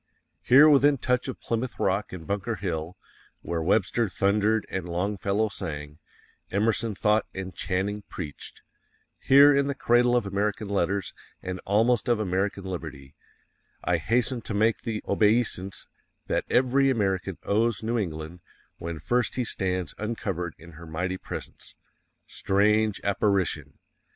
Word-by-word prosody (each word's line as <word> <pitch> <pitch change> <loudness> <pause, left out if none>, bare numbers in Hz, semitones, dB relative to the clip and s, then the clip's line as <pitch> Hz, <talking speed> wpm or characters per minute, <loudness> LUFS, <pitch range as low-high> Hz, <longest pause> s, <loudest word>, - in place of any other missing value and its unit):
_ - - -52 0.4
Here 140 +5 +7
within 145 -1 +5
touch 125 0 0
of 130 - -5
Plymouth 115 +1 -3
Rock 100 +2 0
and 90 -3 -8
Bunker 100 +3 -2
Hill 85 -3 -4 0.5
_WHERE 85 -1 -2
WEBSTER 105 +4 +1
THUNDERED 105 +3 +1
and 95 -2 -3
Longfellow 100 +4 0
sang, 75 -6 -6 0.5
Emerson 110 +1 0
thought 105 +2 +2
AND 95 -1 -6
CHANNING 100 +2 -2
PREACHED 75 -6 -8 0.6
HERE 140 +1 +7
IN 140 0 +2
THE 140 - -2
CRADLE 120 -1 +3
OF 120 -3 +1
AMERICAN 100 +1 -2
LETTERS 100 0 -1 0.3
and 90 0 -4
almost 115 +5 +2
of 120 -2 +3
American 100 0 -1
liberty,_ 80 -7 -7 0.7
I 90 - +2
hasten 120 - 0
to 110 - -5
make 110 +2 +2
the 110 -2 -4
obeisance 105 -3 +1 0.4
that - - -1
every 130 +2 +3
American 95 -6 0
owes 110 0 +1
New 115 +1 0
England 80 -2 -5 0.4
when 85 -1 -5
first 120 +10 0
he 125 - 0
stands 90 -5 -2
uncovered 95 -6 -3
in 85 +2 -14
her 85 +1 -12
mighty 90 +4 -3
presence. - - -8 0.5
_Strange 105 +2 +1
apparition! 95 -8 0
100 Hz, 140 wpm, -26 LUFS, 90-115 Hz, 0.7 s, Here